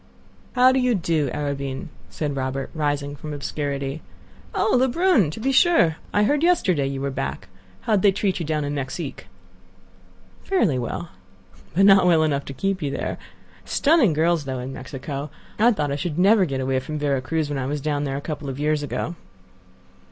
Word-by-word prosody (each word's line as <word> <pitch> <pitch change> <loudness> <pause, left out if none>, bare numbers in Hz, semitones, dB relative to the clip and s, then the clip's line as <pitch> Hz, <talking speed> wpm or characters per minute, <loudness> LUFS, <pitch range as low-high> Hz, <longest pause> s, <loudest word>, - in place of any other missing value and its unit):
"How 255 0 +6
do 260 - +2
you 250 -2 +2
do, 165 -6 0
Arobin?" 140 +2 -3 0.2
said 145 -3 -3
Robert, 130 0 -3
rising 145 -2 -1
from 150 +2 -8
the 150 - -4
obscurity. 140 0 -3 0.5
"Oh! - - +2
Lebrun. 260 - +3
To 155 - -7
be 265 +4 0
sure! 265 - +4
I 205 - +3
heard 290 +7 +2
yesterday 190 - +2
you 135 0 -4
were 140 0 -2
back. 135 +1 -4 0.3
How 220 - 0
did 195 - +2
they 200 - +5
treat 190 -1 -1
you 170 - -3
down 155 -1 0
in 145 0 -3
Mexique?" 140 +1 -5 1.2
"Fairly 205 - +1
well." 140 +7 -4 0.7
"But 195 +2 +5
not 195 -2 +7
well 165 -3 +5
enough 140 -3 0
to - - -7
keep 195 +6 -2
you 145 - -1
there. - - -3 0.4
Stunning 285 - +3
girls, 160 0 +1
though, 130 -1 -3
in 125 +2 -5
Mexico. 140 +2 -6 0.3
I 235 +3 +6
thought 150 -10 -1
I - - 0
should 150 +1 -3
never 195 +2 +5
get 135 -4 -3
away 130 0 0
from 155 +4 -5
Vera 140 -3 0
Cruz 160 +3 -1
when 145 -1 -3
I 130 - -2
was 145 +1 -2
down 145 0 -1
there 135 -1 -2
a - - -4
couple 150 -2 -5
of 135 +1 -6
years 150 0 +1
ago." 150 +3 -3
150 Hz, 195 wpm, -23 LUFS, 140-195 Hz, 1.2 s, not